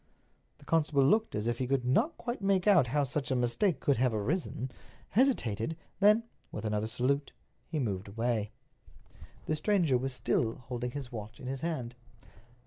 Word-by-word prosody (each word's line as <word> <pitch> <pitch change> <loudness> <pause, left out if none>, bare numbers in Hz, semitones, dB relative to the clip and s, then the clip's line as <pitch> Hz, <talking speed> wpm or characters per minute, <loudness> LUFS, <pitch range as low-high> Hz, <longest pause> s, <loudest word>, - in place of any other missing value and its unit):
The - - -18
constable 150 -4 +3
looked 215 +10 +3
as 105 +1 -2
if 120 0 -1
he 130 - -1
could 135 -1 0
not 140 - +2
quite 240 -3 -4
make 195 -2 +2
out 185 -11 +6
how 145 +4 +1
such 135 0 -2
a 130 - +1
mistake 125 - +1
could 140 - +2
have 125 -2 +2
arisen, 130 - -2 0.4
hesitated, 160 - +1 0.2
then, 210 +3 +5 0.3
with - - -5
another 105 0 0
salute, 130 +5 0 0.3
he 165 - -3
moved 100 -8 -2
away. 110 0 -1 1.0
The 155 - 0
stranger 160 -5 +2
was 135 +1 -2
still 120 -2 0
holding 125 -1 -5
his 135 0 -6
watch 110 0 -7
in - - -9
his 135 +1 -4
hand. 140 -8 -3
130 Hz, 170 wpm, -31 LUFS, 120-165 Hz, 1.0 s, out